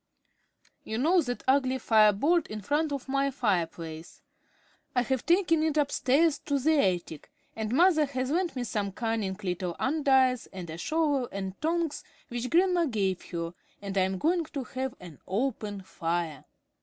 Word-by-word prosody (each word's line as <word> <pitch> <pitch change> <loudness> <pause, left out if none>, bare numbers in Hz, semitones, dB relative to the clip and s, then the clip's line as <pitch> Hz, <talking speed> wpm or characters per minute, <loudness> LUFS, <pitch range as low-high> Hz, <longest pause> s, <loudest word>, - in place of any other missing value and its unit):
"You 220 - -4
know 335 +8 +4
that 245 -4 -4
ugly 260 -1 +3
fire 220 -3 +5
board 300 - +2
in 215 0 -6
front 295 +8 0
of 275 -2 -4
my 275 +1 +1
fireplace? 170 - -3 0.7
I 245 - +3
have 260 -1 -2
taken 340 -2 +3
it 310 -1 0
upstairs 290 +1 +2
to 285 - -1
the 305 +3 +3
attic, 175 - -1 0.3
and 220 -1 -3
mother 315 +2 +4
has 260 -1 -2
lent 345 -1 0
me 250 - -2
some 205 -4 -2
cunning 220 -4 -2
little 180 -1 -2
andirons 265 -4 +2
and 180 -4 -7
a 160 - -6
shovel 290 - 0
and 190 -1 -4
tongs 325 -1 -1 0.3
which 240 +1 -3
grandmamma 350 +1 +3
gave 195 -7 -1
her, 170 -1 -4 0.3
and 200 -1 -6
I 195 - +3
am 190 0 0
going 335 - +1
to 280 -3 -5
have 260 +1 -4
an 170 -5 -12
open 210 -2 -2
fire." 165 -5 -3
255 Hz, 165 wpm, -28 LUFS, 195-300 Hz, 0.7 s, fire